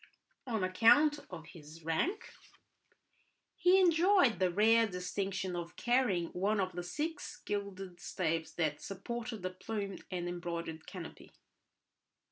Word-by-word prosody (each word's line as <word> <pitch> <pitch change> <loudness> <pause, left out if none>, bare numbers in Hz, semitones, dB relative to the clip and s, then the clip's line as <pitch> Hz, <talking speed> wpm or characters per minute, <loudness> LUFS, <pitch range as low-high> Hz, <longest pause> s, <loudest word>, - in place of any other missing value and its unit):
On 220 -5 -1
account 260 +11 +5
of 165 -4 -8
his 160 0 -13
rank 165 - -1 1.2
he 360 +2 +5
enjoyed 350 - +4
the 185 -1 +3
rare 225 +5 +4
distinction 190 0 -3
of 170 -1 -5
carrying 240 -9 +1
one 200 +4 0
of 185 -1 0
the 175 - -4
six 300 - -4
gilded 195 -3 -4
staves 165 -3 -2
that 155 -3 0
supported 225 +2 -5
the 185 - -2
plumed 200 +1 -5
and 175 -2 -3
embroidered 170 -2 -5
canopy. 180 -4 -9
190 Hz, 120 wpm, -33 LUFS, 175-230 Hz, 1.2 s, account